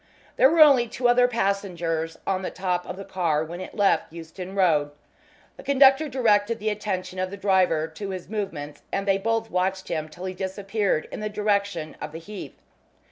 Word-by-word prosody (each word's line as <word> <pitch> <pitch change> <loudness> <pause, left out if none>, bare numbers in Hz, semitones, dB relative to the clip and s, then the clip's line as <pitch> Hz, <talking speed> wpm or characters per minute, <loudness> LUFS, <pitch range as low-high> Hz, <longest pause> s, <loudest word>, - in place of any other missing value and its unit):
There 265 - +6
were 325 +1 +4
only 275 -6 +7
two 245 +2 0
other 245 +1 +5
passengers 180 -7 -1
on 190 -1 0
the 185 - -3
top 180 -1 -2
of - - -6
the 195 - -7
car 170 -6 0
when 170 +3 -7
it 185 - -8
left 200 -6 +2
Euston 175 +3 -8
Road. 160 -7 +3 0.7
The - - -11
conductor 275 +2 +5
directed 230 -4 +2
the 215 0 -1
attention 190 -3 -4
of 185 0 -1
the 200 - -7
driver 185 -5 +2
to 195 +5 -7
his 185 -2 -6
movements, 190 -8 -5
and 195 0 -2
they 195 0 +3
both 225 +2 -1
watched 190 +1 -1
him 155 -1 -3
till 175 +4 -9
he 185 - -3
disappeared 195 -1 -1
in - - -6
the 215 0 -3
direction 200 -6 -1
of 150 0 -6
the - - -5
Heath. 200 +5 -9
195 Hz, 190 wpm, -25 LUFS, 175-210 Hz, 0.7 s, only